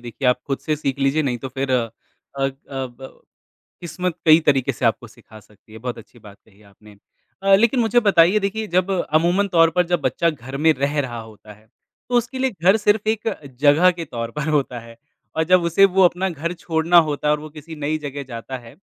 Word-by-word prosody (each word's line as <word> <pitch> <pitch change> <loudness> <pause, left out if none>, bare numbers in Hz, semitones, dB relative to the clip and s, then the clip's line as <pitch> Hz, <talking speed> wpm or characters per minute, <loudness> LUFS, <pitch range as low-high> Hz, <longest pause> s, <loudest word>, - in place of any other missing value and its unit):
देखिए 120 +2 -3
आप 125 - +3
ख़ुद 135 -1 -2
से 155 -1 -2
सीख 140 -2 -3
लीजिए 140 +3 +1
नहीं 125 -4 -2
तो 135 - -6
फ़िर 135 +1 -4
अ 120 -3 +1 0.5
अ 135 0 +1 0.2
ब 130 -1 -7 0.7
किस्मत 175 +1 -4
कई 160 +1 +7
तरीक़े 135 -3 +2
से - - -6
आपको - - 0
सिखा 110 - -17
सकती 105 +1 -23
है। 110 - -10
बहुत 125 +1 -5
अच्छी 115 +2 -15
बात 105 -2 -15
कही 105 -1 -24
आपने 105 +1 -19 0.5
अ, 195 0 +5
लेकिन 235 +5 +3
मुझे 230 +1 +3
बताइए 190 -2 +4
देखिए 215 +3 -3
जब 185 +1 +2 0.2
अमूमन 175 +6 +2
तौर 165 -3 +4
पर 180 - +3
जब 175 -1 0
बच्चा 140 +5 0
घर 135 -3 -9
में 160 +3 +4
रह 145 +2 -1
रहा 120 -4 -5
होता 110 -1 -14
है 105 +1 -21 0.4
तो 245 - -3
उसके 240 +2 -1
लिए 260 0 +1
घर 190 +5 +5
सिर्फ़ 210 0 +1
एक 220 0 -1 0.3
जगह 150 +5 +5
के 170 -1 -6
तौर 115 -5 -6
पर 150 +1 -3
होता 140 -5 0
है 115 0 -14 0.4
और 160 - +1
जब 185 - +6
उसे 170 +4 +4
वो 190 - +6
अपना 180 +2 +1
घर 170 +1 -4
छोड़ना 165 0 0
होता 145 0 -2
है 150 - +4
और 150 - -5
वो 155 - -9
किसी 155 +2 -11
नई 150 +1 -2
जगह 145 -1 -6
जाता 120 +2 -7
है 120 0 -15
150 Hz, 220 wpm, -21 LUFS, 125-180 Hz, 0.7 s, कई